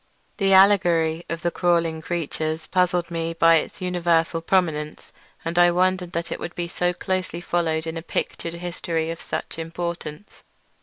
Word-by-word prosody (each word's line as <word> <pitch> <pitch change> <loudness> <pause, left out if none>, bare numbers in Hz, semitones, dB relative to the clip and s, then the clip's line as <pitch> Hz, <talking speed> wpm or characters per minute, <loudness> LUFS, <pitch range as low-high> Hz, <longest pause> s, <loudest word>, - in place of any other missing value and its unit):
The 195 -2 +2
allegory 175 -4 +4
of 170 0 -4
the 175 - +1
crawling 170 -3 +1
creatures 160 -1 -2
puzzled 180 -2 +1
me 165 0 -2
by 165 0 +6
its 155 - -4
universal 170 -2 +1
prominence, 160 -4 -1 0.3
and 170 +1 0
I 175 0 +7
wondered 180 0 +1
that 170 +1 -3
it - - -3
should 175 - -6
be 175 -1 -2
so 175 +1 0
closely 185 -1 -3
followed 165 -2 -1
in 160 0 -4
a - - -4
pictured 170 0 -3
history 170 -2 -3
of 165 - -7
such - - -5
importance. 170 +1 -6
170 Hz, 160 wpm, -23 LUFS, 165-175 Hz, 0.3 s, I